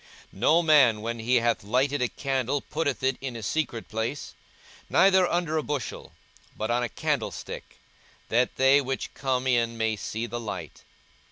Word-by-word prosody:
42:011:033 -, -, -14 dB
No 160 Hz, +9 st, +4 dB
man, 135 Hz, -9 st, +5 dB
when 115 Hz, +1 st, -4 dB
he 120 Hz, +3 st, +1 dB
hath 120 Hz, -2 st, +2 dB
lighted 130 Hz, +6 st, +1 dB
a 125 Hz, -, +2 dB
candle, 135 Hz, +1 st, -1 dB
putteth 145 Hz, -2 st, -3 dB
it 130 Hz, -1 st, +1 dB
in 130 Hz, -3 st, -5 dB
a 115 Hz, -, -6 dB
secret 120 Hz, -1 st, -2 dB
place, 115 Hz, +6 st, -4 dB, 0.6 s
neither 190 Hz, -2 st, +4 dB
under 170 Hz, -2 st, 0 dB
a -, -, +1 dB
bushel, 145 Hz, -5 st, -4 dB, 0.5 s
but 110 Hz, +2 st, -2 dB
on 120 Hz, +1 st, +2 dB
a 120 Hz, -, -1 dB
candlestick, 110 Hz, -, -4 dB, 0.5 s
that 120 Hz, +2 st, +1 dB
they 135 Hz, +2 st, +5 dB
which 135 Hz, 0 st, -4 dB
come 130 Hz, -2 st, -1 dB
in 120 Hz, -2 st, +1 dB
may 110 Hz, -1 st, 0 dB
see 110 Hz, +2 st, -4 dB
the 120 Hz, 0 st, -5 dB
light. 95 Hz, -9 st, -7 dB
125 Hz, 170 wpm, -26 LUFS, 115-145 Hz, 0.6 s, man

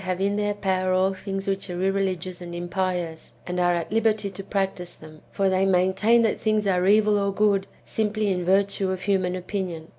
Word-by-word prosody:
95 185 Hz, -1 st, -2 dB
have 200 Hz, +1 st, +1 dB
in -, -, -1 dB
their 205 Hz, 0 st, -1 dB
power 185 Hz, -2 st, 0 dB
all 190 Hz, +1 st, +2 dB
things 195 Hz, 0 st, -5 dB
which 195 Hz, 0 st, -2 dB
are 175 Hz, 0 st, -4 dB
irreligious 185 Hz, -2 st, -1 dB
and 175 Hz, -1 st, -7 dB
im 175 Hz, 0 st, -4 dB
pious, 180 Hz, -3 st, -3 dB
and 180 Hz, 0 st, -3 dB
are 175 Hz, 0 st, +3 dB
at 170 Hz, +2 st, -4 dB
liberty 215 Hz, -2 st, +1 dB
to 195 Hz, +1 st, -7 dB
practise 190 Hz, -3 st, -3 dB
them; 155 Hz, -1 st, -14 dB
for 195 Hz, -, 0 dB
they 190 Hz, 0 st, +2 dB
maintain 195 Hz, +5 st, +3 dB
that 220 Hz, -, +1 dB
things 215 Hz, -1 st, +1 dB
are 185 Hz, -1 st, +2 dB
evil 210 Hz, 0 st, +4 dB
or 200 Hz, 0 st, 0 dB
good, 195 Hz, -1 st, +1 dB, 0.2 s
simply 215 Hz, -1 st, -1 dB
in 180 Hz, -1 st, -1 dB
virtue 195 Hz, +1 st, +1 dB
of 185 Hz, -1 st, -3 dB
human 185 Hz, -2 st, +1 dB
opinion. 180 Hz, -3 st, -5 dB
190 Hz, 210 wpm, -24 LUFS, 180-200 Hz, 0.2 s, evil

